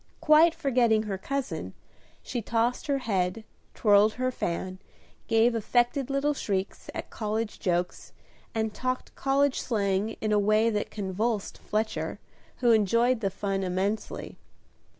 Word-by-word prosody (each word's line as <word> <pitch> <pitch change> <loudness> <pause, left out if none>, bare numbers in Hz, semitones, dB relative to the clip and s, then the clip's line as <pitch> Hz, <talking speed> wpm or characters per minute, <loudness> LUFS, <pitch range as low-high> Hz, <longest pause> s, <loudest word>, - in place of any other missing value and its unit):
Quite 315 +2 +5
forgetting 235 -5 +2
her 200 -3 -4
cousin, 275 +5 -4 0.5
she 240 - -3
tossed 235 +6 0
her 280 -1 +2
head, 205 -4 -1 0.3
twirled 210 0 +5
her 255 0 -1
fan, 185 -3 -3 0.5
gave 225 +2 +4
affected 240 +4 +1
little 275 +2 +1
shrieks 195 -7 -3
at - - -6
college 215 0 -3
jokes, 175 -1 -2 0.4
and 220 -1 -1
talked 255 +2 -3
college 275 0 +1
slang 205 -2 0
in 215 - -1
a 210 - +4
way 215 +2 +3
that 210 -1 -2
convulsed 205 +2 -2
Fletcher, 215 +1 -2 0.4
who 240 -2 +5
enjoyed 230 +3 +3
the 200 -3 0
fun 195 0 -2
immensely. 190 +4 -2
220 Hz, 130 wpm, -27 LUFS, 200-245 Hz, 0.5 s, Quite